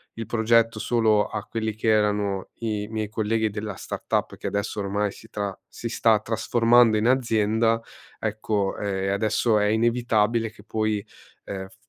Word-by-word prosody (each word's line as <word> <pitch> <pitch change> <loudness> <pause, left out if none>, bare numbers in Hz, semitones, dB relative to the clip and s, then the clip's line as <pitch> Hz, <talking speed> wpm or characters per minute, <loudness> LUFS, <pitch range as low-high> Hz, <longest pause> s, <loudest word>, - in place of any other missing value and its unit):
il 115 - -5
progetto 115 0 +2
solo 110 -3 +2
a 105 -1 -5
quelli 110 -1 -3
che 110 - -4
erano 105 -2 +1
i 105 -3 -3
miei 110 -1 -2
colleghi 110 0 0
della 105 0 -5
startup, - - -3
che - - -6
adesso 100 +1 -2
ormai 100 +1 -1
si 110 - -15
tra 100 -4 -4
si - - -6
sta 110 -2 +3
trasformando 115 +1 +3
in 110 +2 +1
azienda, 115 -2 +2 0.4
ecco, 105 -2 -1
ehm, 95 -1 -1
adesso 110 +2 +2
è 105 - +2
inevitabile 115 0 +2
che 105 -1 -17
poi, 110 -1 -1 0.4
ehm, 95 -1 -5
f 115 - -20
110 Hz, 155 wpm, -25 LUFS, 105-115 Hz, 0.4 s, sta